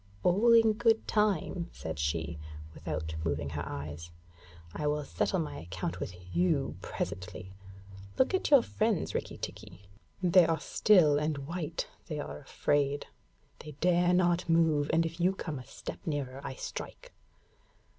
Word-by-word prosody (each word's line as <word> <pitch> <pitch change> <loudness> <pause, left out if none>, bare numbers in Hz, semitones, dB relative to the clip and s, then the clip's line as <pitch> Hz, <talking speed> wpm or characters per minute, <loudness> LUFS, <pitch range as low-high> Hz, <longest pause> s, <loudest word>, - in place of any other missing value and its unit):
'All 205 +7 +4
in 225 -1 +6
good 225 0 +2
time,' 190 -4 +1
said 80 -3 -6
she, 80 +2 -1 0.3
without 80 0 -4
moving 70 -3 -1
her 75 -1 -3
eyes. 75 +3 -6 0.6
'I 150 - -2
will 150 0 0
settle 185 - 0
my 160 - -3
account 90 +1 -4
with 90 - -5 0.2
you 165 -6 +2
presently. 95 -1 -5 0.6
Look 260 - +3
at 375 - +1
your 280 -5 +7
friends, 215 -4 0
Rikki - - -3
tikki. 100 - -8 0.4
They 180 -1 +6
are 165 -1 +1
still 155 -4 +4
and 150 -2 -2
white; 165 -1 -3 0.2
they 150 -3 -4
are 145 - -5
afraid. 145 0 0 0.5
They 150 - -9
dare 175 +4 +3
not 175 -1 +2
move, 160 -3 +3
and 165 +1 +3
if 165 +1 -5
you 180 +2 +3
come 155 -7 -4
a - - -9
step - - -7
nearer 140 -4 -3
I 130 - -5
strike.' - - -7
155 Hz, 150 wpm, -31 LUFS, -, 0.6 s, your